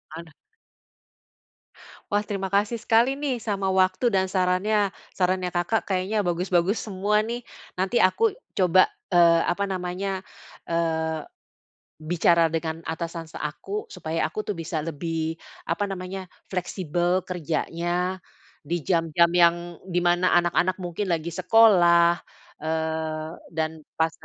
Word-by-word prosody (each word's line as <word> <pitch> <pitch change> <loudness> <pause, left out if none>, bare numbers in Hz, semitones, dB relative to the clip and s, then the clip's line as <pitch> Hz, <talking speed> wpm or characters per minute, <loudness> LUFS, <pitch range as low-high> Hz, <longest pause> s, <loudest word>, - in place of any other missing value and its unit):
Aduh. 165 0 -9 1.8
Wah, 205 0 +2
terima 195 -2 -3
kasih 205 +4 0
sekali 235 +6 +2
nih, 285 -3 0
sama 200 -3 -1
waktu 190 +4 +2
dan 190 -1 +1
sarannya. 190 +2 +1 0.2
Sarannya 185 -1 0
Kakak 175 +6 0
kayaknya 195 +3 0
bagus-bagus 180 +2 +1
semua, 205 +1 +1
nih. 235 +3 -3 0.3
Nanti 190 +6 +1
aku 435 - +3 0.2
coba, 185 0 +5 0.2
eee, 170 -2 +6
apa 200 +3 0
namanya, 190 +1 -3 0.5
eee, 160 -1 -1 0.8
bicara 170 0 +3
dengan 165 0 -3
atasan 165 0 -5
s - - -8
aku, 175 +8 -4
supaya 165 -3 -2
aku 215 +7 -5
tuh 210 - -3
bisa 160 -1 -3
lebih, 165 0 -3 0.3
apa 205 +4 0
namanya, 190 0 -6 0.2
fleksibel 180 -1 -1
kerjanya, 175 +1 -2 0.4
di 165 +2 -3
jam-jam 170 0 +2
yang 175 0 +2
dimana 175 0 +2
anak-anak 175 +1 +2
mungkin 175 +3 -3
lagi 165 +1 -5
sekolah, 175 -3 +5 0.4
eee, 160 0 -2 0.3
dan 160 -1 -3
pas 160 0 +1
175 Hz, 120 wpm, -25 LUFS, 165-195 Hz, 1.8 s, eee